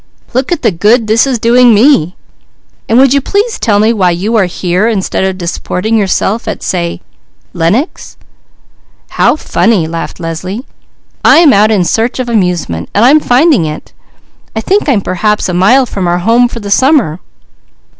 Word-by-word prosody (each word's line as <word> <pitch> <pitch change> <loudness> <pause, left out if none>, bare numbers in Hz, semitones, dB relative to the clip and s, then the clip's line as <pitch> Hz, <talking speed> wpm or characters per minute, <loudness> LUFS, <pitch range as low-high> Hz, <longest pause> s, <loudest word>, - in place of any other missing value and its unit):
Look 260 +5 -2
at 350 - -2
the 225 - +2
'good' 215 +7 +1
this 220 +4 +2
is 260 -3 -1
doing 235 +1 +4
me. 205 - +2 0.7
And 225 - +2
would 265 0 +4
you 280 - +2
please 410 - -2
tell 210 -4 +1
me 215 +3 +2
why 190 -5 +1
you 190 +7 -2
are 210 -4 +3
here, 180 +3 -1
instead 200 -4 -2
of 190 -1 -2
disporting 180 +4 -3
yourself 210 +1 -1
at, - - -5
say 170 -1 -3 0.5
Lenox?" 185 - -2 0.9
"How - - +1
funny!" 225 - 0
laughed 165 +2 -6
Leslie. 180 - -6 0.6
"I - - +5
am 320 -5 +5
out 210 +2 +3
in 205 -5 +1
search 225 +7 -1
of 255 -2 -4
amusement, 180 - -2
and 210 +4 +3
I'm 290 +5 +5
finding 265 - +2
it. 150 - -8 0.6
I 220 - -2
think 390 - 0
I'm 230 -7 +1
perhaps 210 +3 -1
a 180 - -3
mile 210 +10 +3
from 195 -6 -4
our 175 0 0
home 230 +7 +2
for 235 - -8
the 200 -2 -7
summer." 260 - +2
215 Hz, 175 wpm, -10 LUFS, 180-245 Hz, 0.9 s, I